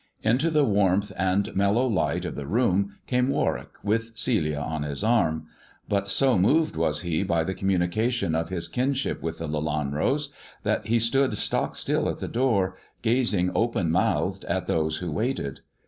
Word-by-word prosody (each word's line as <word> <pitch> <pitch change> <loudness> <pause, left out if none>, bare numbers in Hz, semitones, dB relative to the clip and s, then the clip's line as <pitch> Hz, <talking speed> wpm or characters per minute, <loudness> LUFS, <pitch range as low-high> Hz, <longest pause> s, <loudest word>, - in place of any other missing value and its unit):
Into 125 +9 +2
the 150 -3 +3
warmth 100 -1 +2
and 95 +2 0
mellow 100 +6 +3
light 110 -7 0
of - - -3
the 70 -1 -6
room 100 - +1
came 125 0 +1
Warwick, - - 0
with 115 +2 -1
Celia 95 - +1
on 75 +1 -3
his 75 +4 -3
arm; 95 -9 +2 0.4
but 100 0 0
so 125 +1 +3
moved 150 - +3
was 80 -2 0
he 85 -2 -1
by 85 -4 +1
the 95 - -2
communication 95 +2 0
of 80 +1 -1
his 90 -3 -3
kinship 130 +2 -1
with 80 0 -4
the 85 - -5
Lelanros, 75 - -1 0.3
that 110 - 0
he 115 +2 +3
stood 130 +4 +2
stock - - -1
still - - 0
at - - -3
the - - -4
door, 100 -7 +1 0.3
gazing 110 -6 +2
open 110 -8 +1
mouthed - - +1
at - - -1
those 80 -1 0
who 85 0 -4
waited. 105 - -2
100 Hz, 170 wpm, -26 LUFS, 80-120 Hz, 0.4 s, the